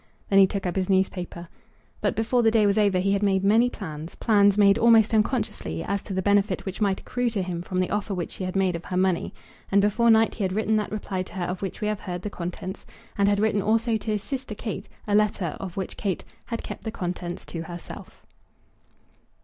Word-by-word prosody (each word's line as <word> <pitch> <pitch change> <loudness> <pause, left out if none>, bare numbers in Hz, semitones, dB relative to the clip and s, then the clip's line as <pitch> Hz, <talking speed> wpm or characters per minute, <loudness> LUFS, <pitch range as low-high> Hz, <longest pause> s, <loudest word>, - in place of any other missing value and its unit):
Then 195 - +6
he 195 - +7
took 195 0 -4
up 180 - -1
his 190 -1 -1
newspaper. 180 -2 -1 0.5
But - - 0
before 230 +2 +2
the 225 - +5
day 220 -1 +3
was 200 +1 +3
over 200 -3 +3
he 195 +2 +1
had 200 - +1
made 195 -2 +2
many 225 +5 +4
plans, 160 -8 -7
plans 205 -3 +4
made 200 -1 +5
almost 225 -1 +5
unconsciously, 210 - 0
as 200 0 -1
to 195 - -7
the 190 - -1
benefit 200 -1 +2
which 190 +2 -5
might 195 -2 +2
accrue 245 -1 -1
to 205 -4 -2
him 175 -2 -4
from 185 +1 -3
the 185 - 0
offer 205 0 -1
which 175 -2 -4
she - - -6
had 185 +1 -4
made 190 -2 +2
of 170 - -6
her 180 - -3
money. 185 -2 +1 0.4
And 200 - +5
before 210 +4 +3
night 225 0 +5
he 210 - -3
had 185 -1 0
written 215 +1 +1
that 210 - -2
reply 200 -3 -3
to 185 - -8
her 185 -2 -2
of 180 +1 -4
which 195 +2 -5
we 210 - 0
have 210 -1 -1
heard 180 -1 -5
the 210 - -4
contents; 180 +1 -6 0.3
and 200 0 +3
had 205 0 +2
written 210 -1 +2
also 225 +3 +2
to 220 - -5
his 210 -1 -2
sister 260 -5 -5
Kate 205 -2 -5 0.2
a 205 - 0
letter, 205 -5 +1
of 190 -2 -7
which 190 - -4
Kate 195 -4 -2 0.2
had 230 -1 -4
kept - - -7
the 220 - -3
contents 180 -3 -5
to 165 - -6
herself. 175 +1 -10
200 Hz, 235 wpm, -25 LUFS, 185-215 Hz, 0.5 s, he